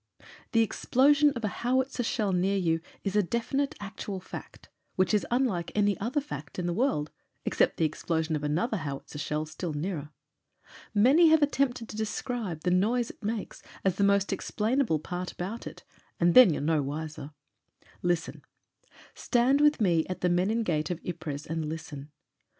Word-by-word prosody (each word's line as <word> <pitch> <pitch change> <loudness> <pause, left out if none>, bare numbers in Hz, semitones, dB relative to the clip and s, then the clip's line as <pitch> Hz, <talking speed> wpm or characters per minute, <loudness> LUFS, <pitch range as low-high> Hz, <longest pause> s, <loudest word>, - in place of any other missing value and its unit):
The 225 0 +5
explosion 285 +6 +3
of 235 - -5
a 205 - -4
howitzer 260 +1 +1
shell 220 -3 0
near 190 +2 +1
you 165 -3 +1 0.2
is 195 -1 -2
a 210 - +5
defi 235 +7 -2
nite, 280 0 0
actual 195 -1 -6
fact 185 - -10
— - - -47
which 185 +3 +2
is 210 - +2
unlike 235 -9 0
any 205 -1 +3
other 240 +8 0
fact 150 - -8
in 180 - -2
the 175 - 0
world, 180 - 0 0.3
except - - +2
the 160 - +2
explosion 160 +1 -1
of 150 - -3
another 170 +10 0
howitzer 145 -2 -6
shell 150 +1 -2
still 155 +1 -5
nearer. 150 -1 -3 0.9
Many 270 +11 +6
have 315 -1 +5
attempted 260 -5 0
to - - -8
describe 220 - -3
the 180 - 0
noise 225 +6 +2
it - - -24
makes 215 0 -4 0.2
as 190 -1 +2
the 200 - +2
most 200 0 +3
explainable 225 - 0
part 180 +4 -5
about 200 +6 -5
it - - -10 0.4
And 170 0 +4
then 255 -8 +9
you're 145 - -2
no 155 0 +2
wiser. 150 +1 -5 0.7
Listen. 175 -2 -1 0.7
Stand 255 +3 +2
with 295 0 +4
me 170 -6 +2
at 185 - -4
the 180 - +2
Menin 195 +6 +1
Gate 155 -5 -1
of 175 -2 -3
Ypres 155 -4 -5
and 160 -1 -3
listen. 155 -3 -7
190 Hz, 175 wpm, -28 LUFS, 160-235 Hz, 0.9 s, then